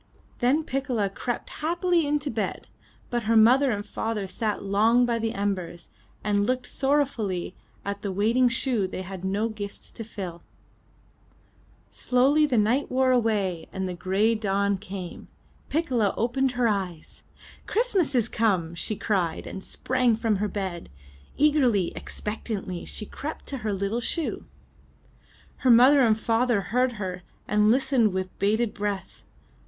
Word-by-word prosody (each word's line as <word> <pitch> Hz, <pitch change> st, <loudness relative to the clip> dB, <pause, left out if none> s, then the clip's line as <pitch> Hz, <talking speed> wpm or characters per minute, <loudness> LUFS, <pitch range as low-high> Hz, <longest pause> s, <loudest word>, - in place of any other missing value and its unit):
Then 270 Hz, +6 st, +2 dB
Piccola 255 Hz, -8 st, -1 dB
crept 240 Hz, +4 st, -4 dB
happily 345 Hz, 0 st, +1 dB
into 290 Hz, 0 st, 0 dB
bed, 215 Hz, -4 st, -3 dB, 0.5 s
but 240 Hz, -2 st, -1 dB
her 225 Hz, +1 st, +3 dB
mother 255 Hz, +5 st, +6 dB
and 205 Hz, -3 st, -2 dB
father 220 Hz, -3 st, -3 dB
sat 210 Hz, +2 st, -2 dB
long 220 Hz, +5 st, +3 dB
by 235 Hz, -1 st, 0 dB
the 225 Hz, 0 st, -1 dB
embers, 185 Hz, -4 st, -3 dB, 0.3 s
and 205 Hz, 0 st, +2 dB
looked 255 Hz, 0 st, 0 dB
sorrow 285 Hz, +2 st, +2 dB
fully 195 Hz, -9 st, -4 dB, 0.3 s
at 200 Hz, 0 st, -3 dB
the 200 Hz, -, -3 dB
waiting 230 Hz, +6 st, +3 dB
shoe 235 Hz, -4 st, 0 dB
they 185 Hz, 0 st, -5 dB
had 190 Hz, 0 st, -8 dB
no 200 Hz, +4 st, 0 dB
gifts 205 Hz, -2 st, -7 dB
to 225 Hz, -, -7 dB
fill. 185 Hz, -6 st, -7 dB, 1.5 s
Slowly 275 Hz, +5 st, +3 dB
the 255 Hz, -4 st, +1 dB
night 230 Hz, +7 st, +2 dB
wore 260 Hz, 0 st, +2 dB
away 205 Hz, -8 st, +1 dB
and 190 Hz, 0 st, -3 dB
the 180 Hz, -, -3 dB
gray 195 Hz, +6 st, +1 dB
dawn 200 Hz, -2 st, 0 dB
came. 190 Hz, -3 st, -8 dB, 0.4 s
Piccola 255 Hz, -10 st, +1 dB
opened 255 Hz, +3 st, +1 dB
her 245 Hz, -1 st, +2 dB
eyes. 185 Hz, -6 st, -3 dB, 0.5 s
''Christmas 400 Hz, -, +1 dB
is 235 Hz, -3 st, +3 dB
come!*' 190 Hz, -9 st, 0 dB
she 190 Hz, +5 st, -2 dB
cried 185 Hz, -6 st, -1 dB
and 190 Hz, -, -7 dB
sprang 250 Hz, -3 st, +1 dB
from 220 Hz, -2 st, 0 dB
her 210 Hz, +2 st, 0 dB
bed. 190 Hz, -4 st, -4 dB, 0.5 s
Eagerly, 265 Hz, -, +3 dB
expectantly, 205 Hz, -4 st, -5 dB
she 215 Hz, -, -4 dB
crept 300 Hz, +8 st, -7 dB
to 275 Hz, -, -4 dB
her 215 Hz, -2 st, -2 dB
little 200 Hz, +4 st, -1 dB
shoe. 320 Hz, +6 st, -2 dB, 1.1 s
Her 260 Hz, -, +1 dB
mother 255 Hz, +4 st, +7 dB
and 220 Hz, -4 st, +4 dB
father 225 Hz, -2 st, 0 dB
heard 250 Hz, 0 st, +2 dB
her, 185 Hz, -4 st, -5 dB, 0.3 s
and 210 Hz, 0 st, +3 dB
listened 245 Hz, -4 st, +3 dB
with 185 Hz, -1 st, -3 dB
bated 215 Hz, +3 st, +1 dB
breath. 205 Hz, -1 st, -4 dB
220 Hz, 150 wpm, -26 LUFS, 195-250 Hz, 1.5 s, mother